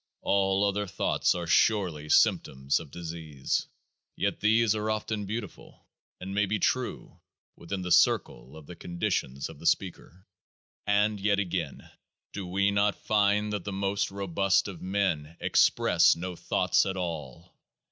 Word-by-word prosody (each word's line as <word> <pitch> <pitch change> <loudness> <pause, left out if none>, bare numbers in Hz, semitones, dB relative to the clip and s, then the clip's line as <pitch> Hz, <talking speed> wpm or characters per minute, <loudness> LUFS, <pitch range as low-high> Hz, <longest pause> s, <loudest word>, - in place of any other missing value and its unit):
All 95 0 +2
other 100 +1 -1
thoughts - - 0
are 85 -1 -3
surely 85 -5 +1
symptoms 65 -1 +2
of 80 - -10
disease. 80 -4 -4 0.5
Yet - - -1
these 110 0 +3
are 110 0 -2
often 110 -1 -3
beautiful, 105 -2 -7 0.3
and 95 +1 -6
may 105 0 +1
be 105 +2 0
true 125 +5 -2 0.4
within 95 +2 -6
the 90 - -4
circle 70 -3 +2
of 80 - -12
the 90 - -10
conditions 75 -6 -3
of - - -12
the 85 - -3
speaker. 90 +1 -2 0.6
And 105 +1 +2
yet 100 0 +1
again! 90 -7 -3 0.5
Do 95 -2 -5
we 100 +3 +1
not 100 0 +2
find 105 0 +1
that 100 -4 -3
the 100 - -5
most 100 +1 -1
robust 100 0 0
of 95 -4 -8
men 90 -5 -1
express - - +4
no 90 +2 -5
thoughts - - +1
at 95 0 -3
all? 85 -1 -6
95 Hz, 145 wpm, -28 LUFS, 85-100 Hz, 0.6 s, express